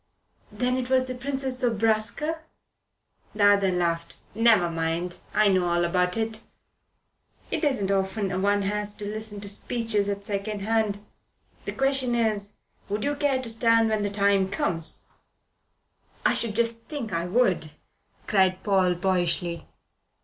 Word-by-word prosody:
"Then 250 Hz, 0 st, 0 dB
it 255 Hz, -1 st, -3 dB
was 260 Hz, 0 st, +3 dB
the 255 Hz, -, -2 dB
Princess 265 Hz, 0 st, -3 dB
Zobraska." 230 Hz, +6 st, 0 dB, 1.0 s
The 205 Hz, -1 st, +3 dB
other 200 Hz, -2 st, +3 dB
laughed. 170 Hz, -2 st, -1 dB, 0.2 s
"Never 220 Hz, -4 st, +4 dB
mind. 165 Hz, +1 st, -2 dB
I 215 Hz, -, +3 dB
know 185 Hz, -2 st, +2 dB
all 175 Hz, 0 st, +2 dB
about 180 Hz, +3 st, +1 dB
it. 220 Hz, 0 st, -2 dB, 1.1 s
It -, -, -1 dB
isn't 235 Hz, -10 st, +1 dB
often 190 Hz, -1 st, -1 dB
one 205 Hz, 0 st, +2 dB
has 205 Hz, +1 st, -2 dB
to 205 Hz, -, -7 dB
listen 210 Hz, 0 st, -3 dB
to 200 Hz, -, -8 dB
speeches 210 Hz, 0 st, -1 dB
at 200 Hz, 0 st, -4 dB
second 205 Hz, 0 st, -3 dB
hand. 210 Hz, -1 st, 0 dB, 0.6 s
The -, -, -3 dB
question 270 Hz, -2 st, +1 dB
is: 215 Hz, -3 st, 0 dB, 0.3 s
Would 205 Hz, +1 st, -2 dB
you 285 Hz, -, 0 dB
care 285 Hz, -2 st, +1 dB
to 235 Hz, -, -6 dB
stand 230 Hz, 0 st, +3 dB
when 215 Hz, -1 st, 0 dB
the 205 Hz, -, 0 dB
time 200 Hz, -1 st, +2 dB
comes?" 165 Hz, -4 st, 0 dB, 1.2 s
"I -, -, +5 dB
should 225 Hz, -3 st, -2 dB
just 230 Hz, 0 st, +1 dB
think 280 Hz, -8 st, -5 dB
I 170 Hz, +1 st, -1 dB
would," 180 Hz, -7 st, +1 dB, 0.5 s
cried 190 Hz, -2 st, +2 dB
Paul 190 Hz, -3 st, +2 dB
boyishly. 175 Hz, -1 st, 0 dB
205 Hz, 145 wpm, -26 LUFS, 190-230 Hz, 1.2 s, I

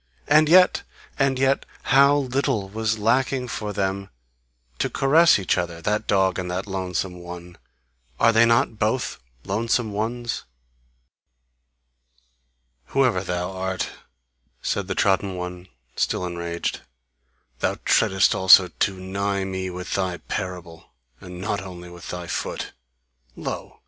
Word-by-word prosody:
And 155 Hz, +1 st, +5 dB
yet! 180 Hz, +2 st, +6 dB, 0.4 s
And 135 Hz, -1 st, +2 dB
yet 135 Hz, +1 st, +2 dB, 0.2 s
how 140 Hz, +2 st, +5 dB
little 130 Hz, -6 st, -1 dB
was 110 Hz, +1 st, -1 dB
lacking 125 Hz, +4 st, +1 dB
for 105 Hz, -2 st, -4 dB
them 100 Hz, -1 st, -2 dB, 0.7 s
to -, -, 0 dB
caress 160 Hz, +5 st, +5 dB
each 95 Hz, -2 st, 0 dB
other, 85 Hz, -1 st, -4 dB
that 105 Hz, +5 st, -1 dB
dog 95 Hz, -2 st, +2 dB
and 90 Hz, -1 st, -4 dB
that 90 Hz, +2 st, -3 dB
lonesome 95 Hz, -2 st, -3 dB
one! 90 Hz, 0 st, -9 dB, 0.6 s
Are 115 Hz, -, +5 dB
they 115 Hz, +1 st, +6 dB
not 115 Hz, -1 st, +2 dB
both 110 Hz, +4 st, -1 dB, 0.2 s
lonesome 115 Hz, +2 st, 0 dB
ones!" 115 Hz, +3 st, -3 dB, 2.4 s
"Whoever 130 Hz, -9 st, +2 dB
thou 90 Hz, 0 st, -3 dB
art," 95 Hz, 0 st, -3 dB, 0.7 s
said 100 Hz, -2 st, -1 dB
the 95 Hz, -, -2 dB
trodden 95 Hz, -1 st, +1 dB
one, 90 Hz, 0 st, -6 dB, 0.3 s
still 90 Hz, -, 0 dB
enraged, 85 Hz, -1 st, -3 dB, 0.8 s
"thou -, -, 0 dB
treadest 95 Hz, 0 st, +3 dB
also 95 Hz, -1 st, +7 dB
too 95 Hz, -1 st, +1 dB
nigh 100 Hz, +1 st, -2 dB
me 95 Hz, -1 st, -3 dB
with 90 Hz, 0 st, -6 dB
thy 95 Hz, -2 st, -1 dB
parable, 90 Hz, -3 st, -6 dB, 0.3 s
and 90 Hz, -1 st, -10 dB
not 100 Hz, +1 st, -2 dB
only 90 Hz, -2 st, -9 dB
with 85 Hz, -1 st, -10 dB
thy 90 Hz, -1 st, -5 dB
foot! -, -, -4 dB, 0.6 s
Lo! -, -, -6 dB
95 Hz, 130 wpm, -23 LUFS, 90-115 Hz, 2.4 s, also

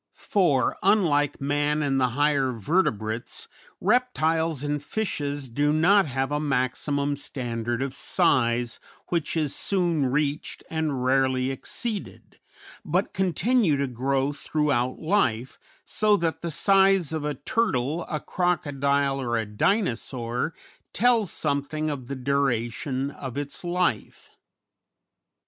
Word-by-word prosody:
For, 165 Hz, -10 st, +1 dB
unlike 170 Hz, -8 st, +2 dB
man 145 Hz, +2 st, 0 dB
and 135 Hz, -2 st, +1 dB
the 125 Hz, -, +4 dB
higher 145 Hz, -3 st, +2 dB
vertebrates, 115 Hz, -, -1 dB, 0.3 s
reptiles 165 Hz, -, +1 dB
and 145 Hz, 0 st, -1 dB
fishes 145 Hz, -9 st, -3 dB
do 145 Hz, +5 st, +1 dB
not 180 Hz, +5 st, +4 dB
have 135 Hz, +1 st, -2 dB
a 145 Hz, -, 0 dB
maximum 140 Hz, +1 st, 0 dB
standard 120 Hz, -3 st, -3 dB
of 135 Hz, -1 st, -4 dB
size 120 Hz, -3 st, +1 dB, 0.3 s
which 165 Hz, -2 st, -1 dB
is 150 Hz, -3 st, 0 dB
soon 175 Hz, -7 st, +1 dB
reached 145 Hz, +3 st, -2 dB
and 155 Hz, -5 st, -1 dB
rarely 130 Hz, 0 st, +2 dB
exceeded, 210 Hz, -, -5 dB, 0.4 s
but -, -, -1 dB
continue 190 Hz, -, +2 dB
to 140 Hz, -, 0 dB
grow 135 Hz, +2 st, -1 dB
throughout 140 Hz, -3 st, 0 dB
life, 130 Hz, -, 0 dB, 0.3 s
so 210 Hz, -1 st, +2 dB
that 165 Hz, -2 st, -2 dB
the 170 Hz, -, -3 dB
size 195 Hz, 0 st, +3 dB
of 160 Hz, -2 st, -2 dB
a 150 Hz, 0 st, -2 dB
turtle, 160 Hz, -, 0 dB
a 155 Hz, -, -2 dB
crocodile, 140 Hz, -6 st, 0 dB
or 120 Hz, -2 st, -1 dB
a 110 Hz, -, -1 dB
Dinosaur 125 Hz, -, -1 dB, 0.4 s
tells 230 Hz, -4 st, +3 dB
something 150 Hz, +1 st, -1 dB
of 130 Hz, -4 st, -6 dB
the 140 Hz, -, -4 dB
duration 130 Hz, 0 st, -1 dB
of 135 Hz, -2 st, -7 dB
its 145 Hz, +3 st, -4 dB
life. 175 Hz, -, -2 dB
145 Hz, 120 wpm, -25 LUFS, 130-165 Hz, 0.4 s, the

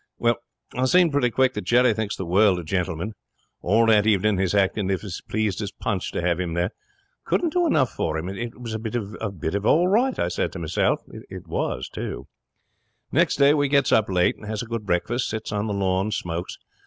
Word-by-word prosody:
'Well, 120 Hz, 0 st, +2 dB, 0.4 s
I 130 Hz, +1 st, 0 dB
seen 175 Hz, +4 st, +4 dB
pretty 140 Hz, -4 st, +2 dB
quick 130 Hz, +2 st, +2 dB
that -, -, -4 dB
Jerry 120 Hz, -1 st, +4 dB
thinks 105 Hz, -1 st, -3 dB
the 95 Hz, -, -5 dB
world 95 Hz, +2 st, +4 dB
of 85 Hz, -, -6 dB
Gentleman. 90 Hz, +3 st, -2 dB, 0.5 s
All 110 Hz, +5 st, +3 dB
that 110 Hz, -2 st, +4 dB
evening 105 Hz, -1 st, +2 dB
he's 95 Hz, +1 st, +1 dB
acting 100 Hz, 0 st, +1 dB
as 95 Hz, -, +2 dB
if -, -, -8 dB
he's 100 Hz, -4 st, -7 dB
as -, -, -8 dB
pleased 110 Hz, -2 st, -2 dB
as 100 Hz, -1 st, -4 dB
Punch 95 Hz, -1 st, -3 dB
to -, -, -1 dB
have 85 Hz, -1 st, +1 dB
him 85 Hz, -2 st, -2 dB
there. 90 Hz, +4 st, 0 dB, 0.5 s
Couldn't 335 Hz, -3 st, 0 dB
do 355 Hz, -1 st, +2 dB
enough 130 Hz, -, +2 dB
for 80 Hz, 0 st, -2 dB
him. 80 Hz, +3 st, -4 dB
It 115 Hz, +6 st, -6 dB
was 115 Hz, -2 st, -6 dB
a 110 Hz, -, -3 dB
bit 110 Hz, +1 st, -5 dB
of 100 Hz, -4 st, -3 dB
all 175 Hz, +3 st, +4 dB
right, 240 Hz, +7 st, +2 dB
I 85 Hz, -, 0 dB
said 90 Hz, -, -2 dB
to -, -, -6 dB
meself. 85 Hz, 0 st, 0 dB
It 95 Hz, -1 st, -10 dB
was, 70 Hz, -4 st, -2 dB
too. -, -, -6 dB, 0.9 s
'Next -, -, +3 dB
day 140 Hz, +1 st, +5 dB
we 145 Hz, -1 st, +2 dB
gets 140 Hz, -2 st, +3 dB
up 110 Hz, -3 st, +3 dB
late 90 Hz, -2 st, +2 dB
and 105 Hz, -, -11 dB
has 110 Hz, 0 st, -3 dB
a -, -, -7 dB
good 115 Hz, -2 st, -5 dB
breakfast, 110 Hz, +8 st, 0 dB
and 110 Hz, -, -2 dB
sits -, -, -8 dB
on 105 Hz, +1 st, -1 dB
the 105 Hz, -, -2 dB
lawn 95 Hz, 0 st, 0 dB
and 110 Hz, -, -3 dB
smokes. 85 Hz, +1 st, -4 dB
105 Hz, 230 wpm, -24 LUFS, 95-120 Hz, 0.9 s, day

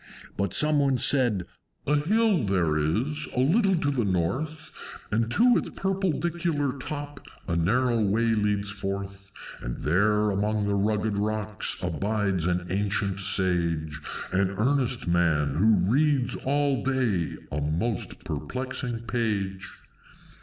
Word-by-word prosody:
But 100 Hz, -3 st, -1 dB
some 150 Hz, -1 st, +3 dB
one 135 Hz, -2 st, +2 dB
said, 120 Hz, -7 st, +3 dB, 0.4 s
"A 150 Hz, -, +2 dB
hill 200 Hz, -, +2 dB
there 90 Hz, -6 st, +1 dB
is, 115 Hz, -, -1 dB
a -, -, 0 dB
little 190 Hz, -, +3 dB
to 145 Hz, -4 st, 0 dB
the 130 Hz, -4 st, 0 dB
north, 110 Hz, -, -2 dB, 0.4 s
And 110 Hz, +2 st, +1 dB
to 240 Hz, -, +4 dB
its -, -, -2 dB
purpledicular 170 Hz, -6 st, -1 dB
top 145 Hz, +1 st, -6 dB, 0.3 s
a 85 Hz, -, 0 dB
narrow 120 Hz, +8 st, +2 dB
way 115 Hz, +3 st, +2 dB
leads 105 Hz, -1 st, 0 dB
forth; 100 Hz, 0 st, -5 dB, 0.3 s
And -, -, -5 dB
there 105 Hz, +6 st, +2 dB
among 105 Hz, +1 st, 0 dB
the 100 Hz, -, 0 dB
rugged 105 Hz, +1 st, 0 dB
rocks 105 Hz, 0 st, 0 dB
abides 100 Hz, 0 st, -1 dB
an 90 Hz, 0 st, 0 dB
ancient 100 Hz, 0 st, -1 dB
Sage, 85 Hz, -5 st, 0 dB, 0.3 s
An 95 Hz, 0 st, +2 dB
earnest 125 Hz, -2 st, +1 dB
Man, 80 Hz, -5 st, +2 dB
who 105 Hz, +8 st, +4 dB, 0.2 s
reads 145 Hz, -2 st, +2 dB
all 140 Hz, -1 st, +1 dB
day 125 Hz, -, 0 dB, 0.2 s
a 75 Hz, +2 st, -2 dB
most 85 Hz, +10 st, -2 dB
perplexing 120 Hz, -, -4 dB
page. 105 Hz, -5 st, -2 dB
110 Hz, 130 wpm, -26 LUFS, 95-135 Hz, 0.4 s, to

